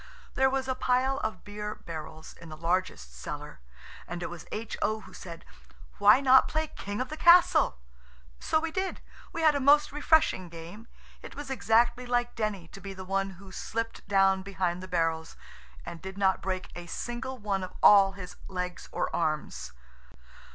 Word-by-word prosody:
There 265 Hz, 0 st, +3 dB
was 265 Hz, 0 st, -1 dB
a 260 Hz, -, +1 dB
pile 255 Hz, +1 st, +1 dB
of 220 Hz, -, -4 dB
beer 210 Hz, +1 st, -5 dB
barrels 160 Hz, -2 st, -8 dB
in 165 Hz, -, -13 dB
the 155 Hz, -, -9 dB
largest 165 Hz, -, -1 dB
cellar -, -, -7 dB, 0.5 s
and 175 Hz, 0 st, -5 dB
it -, -, -4 dB
was 175 Hz, -2 st, -9 dB
H.O. 220 Hz, 0 st, -2 dB
who -, -, -14 dB
said, 170 Hz, -2 st, -10 dB, 0.5 s
"Why 210 Hz, +5 st, +7 dB
not 265 Hz, -1 st, +6 dB
play 315 Hz, 0 st, -1 dB
'King 205 Hz, +1 st, -6 dB
of 255 Hz, -, -2 dB
the 310 Hz, -, -6 dB
Castle?'" 345 Hz, -, +6 dB, 0.6 s
So 315 Hz, -, +1 dB
we 325 Hz, 0 st, -3 dB
did. 380 Hz, +2 st, -2 dB, 0.3 s
We 330 Hz, -, -4 dB
had 310 Hz, -1 st, +6 dB
a 285 Hz, -, 0 dB
most 290 Hz, +2 st, +5 dB
refreshing 295 Hz, -, +2 dB
game. 170 Hz, +7 st, -10 dB, 0.3 s
It -, -, -10 dB
was 290 Hz, -2 st, -7 dB
exactly 240 Hz, 0 st, +2 dB
like 245 Hz, 0 st, 0 dB
Denny 210 Hz, -6 st, -3 dB
to 195 Hz, -, -12 dB
be 195 Hz, +1 st, -7 dB
the 185 Hz, 0 st, -8 dB
one 195 Hz, 0 st, -2 dB
who 195 Hz, 0 st, -13 dB
slipped 225 Hz, +3 st, -4 dB
down 195 Hz, -1 st, +4 dB
behind 185 Hz, -2 st, -2 dB
the 185 Hz, -, -8 dB
barrels, 165 Hz, -2 st, -1 dB, 0.5 s
and 165 Hz, -, -8 dB
did 190 Hz, +1 st, -8 dB
not 190 Hz, -2 st, +2 dB
break 185 Hz, -1 st, -3 dB
a 175 Hz, 0 st, -8 dB
single 240 Hz, +8 st, -5 dB
one 205 Hz, -3 st, -2 dB
of 185 Hz, -, -6 dB
all 195 Hz, -1 st, +8 dB
his 180 Hz, -2 st, -9 dB
legs 180 Hz, -1 st, -5 dB
or -, -, -2 dB
arms. 150 Hz, -, -2 dB
200 Hz, 180 wpm, -29 LUFS, 180-255 Hz, 0.6 s, all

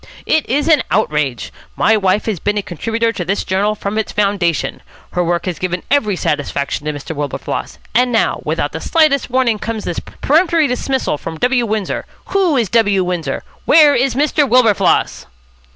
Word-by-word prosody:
"It 315 Hz, -, +1 dB
is 285 Hz, +5 st, +1 dB
an 310 Hz, -5 st, +5 dB
outrage. 140 Hz, -, -1 dB, 0.2 s
My 220 Hz, -, +3 dB
wife 195 Hz, 0 st, +1 dB
has 215 Hz, -6 st, -2 dB
been 205 Hz, +4 st, -1 dB
a 205 Hz, -, -1 dB
contributor 225 Hz, +7 st, -1 dB
to 185 Hz, -, -3 dB
this 195 Hz, +4 st, -1 dB
journal 200 Hz, +3 st, 0 dB
from 205 Hz, +1 st, -3 dB
its 220 Hz, -, -3 dB
foundation. 195 Hz, -6 st, 0 dB, 0.3 s
Her 180 Hz, -, 0 dB
work 170 Hz, 0 st, -1 dB
has 180 Hz, -3 st, -3 dB
given 180 Hz, -1 st, -3 dB
every 220 Hz, -9 st, +2 dB
satisfaction 145 Hz, -2 st, -2 dB
to -, -, +1 dB
Mr. 145 Hz, +2 st, -7 dB
Wilberfloss. 145 Hz, -2 st, -4 dB, 0.2 s
And 245 Hz, +2 st, +3 dB
now, 225 Hz, -, +1 dB
without -, -, -1 dB
the -, -, -6 dB
slightest 310 Hz, -6 st, +2 dB
warning, 245 Hz, -4 st, +1 dB
comes 225 Hz, -1 st, -4 dB
this 175 Hz, -, -3 dB
peremptory 325 Hz, +1 st, +1 dB
dismissal 255 Hz, -, -1 dB
from 160 Hz, -1 st, -6 dB
W. 245 Hz, +3 st, +1 dB
Windsor. 215 Hz, -2 st, -2 dB, 0.2 s
Who 370 Hz, -7 st, +2 dB
is 235 Hz, -4 st, +1 dB
W. 205 Hz, -5 st, +2 dB
Windsor? 175 Hz, -6 st, -3 dB, 0.2 s
Where 300 Hz, -2 st, +6 dB
is 255 Hz, 0 st, +1 dB
Mr. 290 Hz, 0 st, +2 dB
Wilberfloss?" 225 Hz, -6 st, +2 dB
215 Hz, 175 wpm, -17 LUFS, 180-255 Hz, 0.3 s, Where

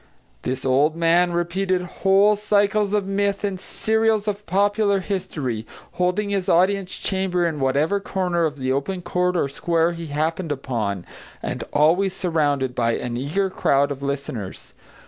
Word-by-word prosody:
This 130 Hz, +1 st, -3 dB
old 140 Hz, +4 st, +3 dB
man 170 Hz, +1 st, +3 dB
repeated 180 Hz, +2 st, 0 dB, 0.2 s
whole 195 Hz, +2 st, +5 dB
cycles 205 Hz, 0 st, +1 dB
of 205 Hz, -2 st, 0 dB
myth 200 Hz, +1 st, -1 dB
and 195 Hz, -2 st, -2 dB
serials 220 Hz, +1 st, +1 dB
of 210 Hz, 0 st, -3 dB
popular 200 Hz, +2 st, +2 dB
history, 150 Hz, -, -3 dB, 0.3 s
holding 180 Hz, +3 st, 0 dB
his 195 Hz, -1 st, -1 dB
audience 190 Hz, +2 st, +2 dB
chamber 190 Hz, -2 st, 0 dB
in 160 Hz, -3 st, -2 dB
whatever 145 Hz, +9 st, +1 dB
corner 180 Hz, -3 st, 0 dB
of 150 Hz, -2 st, -3 dB
the 130 Hz, -1 st, -1 dB
open 175 Hz, +7 st, -2 dB
court 180 Hz, +1 st, 0 dB
or 145 Hz, -, +1 dB
square 165 Hz, +4 st, +1 dB
he 170 Hz, -1 st, -6 dB
happened 160 Hz, +3 st, -2 dB
upon, 110 Hz, -9 st, -3 dB, 0.4 s
and -, -, -3 dB
always 175 Hz, +6 st, +3 dB
surrounded 145 Hz, -8 st, 0 dB
by 115 Hz, -1 st, +1 dB
an 120 Hz, 0 st, -3 dB
eager 170 Hz, +10 st, -1 dB
crowd 140 Hz, -5 st, +2 dB
of 140 Hz, -1 st, -5 dB
listeners. 140 Hz, -8 st, -5 dB
175 Hz, 150 wpm, -22 LUFS, 140-195 Hz, 0.4 s, whole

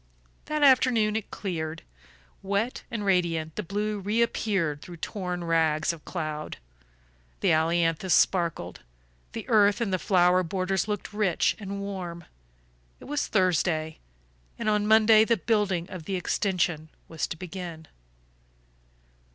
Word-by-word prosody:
That 305 Hz, -1 st, -1 dB
afternoon 250 Hz, -6 st, +4 dB
it 220 Hz, -2 st, -3 dB
cleared. 165 Hz, -5 st, -4 dB, 0.6 s
Wet 200 Hz, +5 st, -1 dB
and 220 Hz, -4 st, -4 dB
radiant 170 Hz, -4 st, 0 dB
the -, -, -2 dB
blue 205 Hz, +3 st, -2 dB
reappeared 200 Hz, -7 st, 0 dB
through 175 Hz, 0 st, -10 dB
torn 180 Hz, 0 st, -4 dB
rags 160 Hz, -1 st, +1 dB
of 160 Hz, -, -12 dB
cloud; 155 Hz, -3 st, -4 dB, 0.8 s
the -, -, +2 dB
ailanthus 165 Hz, +2 st, +1 dB
sparkled; 170 Hz, -4 st, +1 dB, 0.5 s
the -, -, -6 dB
earth 205 Hz, -2 st, +4 dB
in 230 Hz, -5 st, -1 dB
the 185 Hz, -, 0 dB
flower 180 Hz, -1 st, +3 dB
borders 185 Hz, +2 st, -1 dB
looked 210 Hz, -1 st, -4 dB
rich 205 Hz, -5 st, +1 dB
and 200 Hz, -1 st, -5 dB
warm. 180 Hz, -4 st, -6 dB, 0.8 s
It -, -, -13 dB
was 295 Hz, +1 st, -2 dB
Thursday, 170 Hz, -5 st, +1 dB, 0.6 s
and 230 Hz, -, -4 dB
on 210 Hz, -1 st, +2 dB
Monday 220 Hz, 0 st, +6 dB
the 230 Hz, +1 st, +2 dB
building 190 Hz, -3 st, 0 dB
of 180 Hz, -4 st, -7 dB
the 195 Hz, -, -2 dB
extension 175 Hz, -4 st, -1 dB, 0.2 s
was 160 Hz, -1 st, -3 dB
to -, -, -6 dB
begin. 170 Hz, -2 st, -7 dB
185 Hz, 130 wpm, -27 LUFS, 165-210 Hz, 0.8 s, Monday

